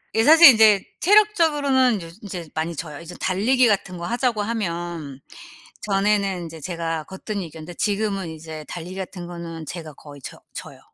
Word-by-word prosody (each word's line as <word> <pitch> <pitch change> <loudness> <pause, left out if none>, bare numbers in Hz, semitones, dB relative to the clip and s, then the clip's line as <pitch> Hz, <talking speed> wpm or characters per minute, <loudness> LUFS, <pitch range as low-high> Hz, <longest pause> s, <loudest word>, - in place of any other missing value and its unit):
예 225 - +3
사실 325 +4 +9
인제 215 -4 +5 0.2
체력적으로는 305 - +3
요즈 165 0 -11
인제 175 -5 -7
많이 160 +2 -2
져요. 150 -1 -7
이제 170 +1 -10
달리기 240 +7 +2
같은 195 -4 -1
거 170 - -5
하자고 240 -2 0
하면 170 - -4 0.6
전에는 195 -3 0
이제 160 0 -10
제가 165 -1 -3
거뜬히 190 0 -6
이겼는데 160 +2 -10
지금은 200 -3 -1
이제 160 -1 -9
달리기 180 +2 -7
같은 185 -2 -7
거는 170 -2 -8
제가 160 -2 -7
거의 145 +1 -13
져 - - -10
져요. - - -9
185 Hz, 355 characters per minute, -22 LUFS, 165-220 Hz, 0.6 s, 사실